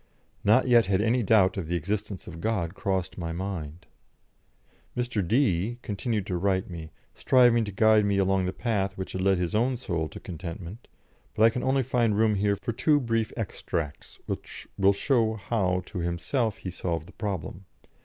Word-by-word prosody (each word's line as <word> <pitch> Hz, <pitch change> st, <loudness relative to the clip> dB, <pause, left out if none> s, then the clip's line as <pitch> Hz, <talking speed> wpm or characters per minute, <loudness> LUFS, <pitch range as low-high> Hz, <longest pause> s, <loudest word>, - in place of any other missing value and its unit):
Not 110 Hz, +6 st, +4 dB
yet 120 Hz, -4 st, +5 dB
had 95 Hz, -1 st, +2 dB
any 115 Hz, +4 st, +2 dB
doubt 100 Hz, -3 st, +4 dB
of 90 Hz, -5 st, -3 dB
the 85 Hz, -, -1 dB
existence 100 Hz, +3 st, -3 dB
of 85 Hz, -1 st, -9 dB
God 100 Hz, -7 st, -1 dB
crossed 95 Hz, -6 st, -2 dB
my 85 Hz, -1 st, -3 dB
mind. 85 Hz, -3 st, -5 dB, 1.1 s
Mr. 120 Hz, -3 st, 0 dB
D 110 Hz, -2 st, +1 dB
continued 105 Hz, 0 st, -2 dB
to 90 Hz, -3 st, -2 dB
write 95 Hz, 0 st, 0 dB
me, 80 Hz, -2 st, -7 dB, 0.2 s
striving 120 Hz, -3 st, +4 dB
to 105 Hz, -, -5 dB
guide 110 Hz, +2 st, +4 dB
me 100 Hz, -1 st, +1 dB
along 95 Hz, -1 st, +2 dB
the -, -, -1 dB
path 100 Hz, -4 st, -1 dB
which 95 Hz, -, -5 dB
had 95 Hz, -, -3 dB
led 95 Hz, 0 st, +3 dB
his 90 Hz, -1 st, -2 dB
own 120 Hz, +4 st, +1 dB
soul 85 Hz, -9 st, -2 dB
to -, -, -9 dB
contentment, 90 Hz, +5 st, -8 dB, 0.5 s
but 110 Hz, -, +3 dB
I 115 Hz, -, +7 dB
can 125 Hz, -, -3 dB
only 135 Hz, 0 st, +2 dB
find 120 Hz, -4 st, +1 dB
room 110 Hz, 0 st, +3 dB
here 100 Hz, 0 st, +1 dB
for 115 Hz, +4 st, -4 dB
two 145 Hz, +5 st, +3 dB
brief 115 Hz, -3 st, -1 dB
extracts, 80 Hz, -8 st, -4 dB
which -, -, -6 dB
will 100 Hz, 0 st, +4 dB
show 110 Hz, +1 st, +1 dB
how 95 Hz, -4 st, -1 dB
to 100 Hz, -, -6 dB
himself 90 Hz, -, -1 dB
he 90 Hz, -, -6 dB
solved 85 Hz, -2 st, -3 dB
the -, -, -14 dB
problem. 95 Hz, -2 st, -5 dB
100 Hz, 185 wpm, -27 LUFS, 90-115 Hz, 1.1 s, I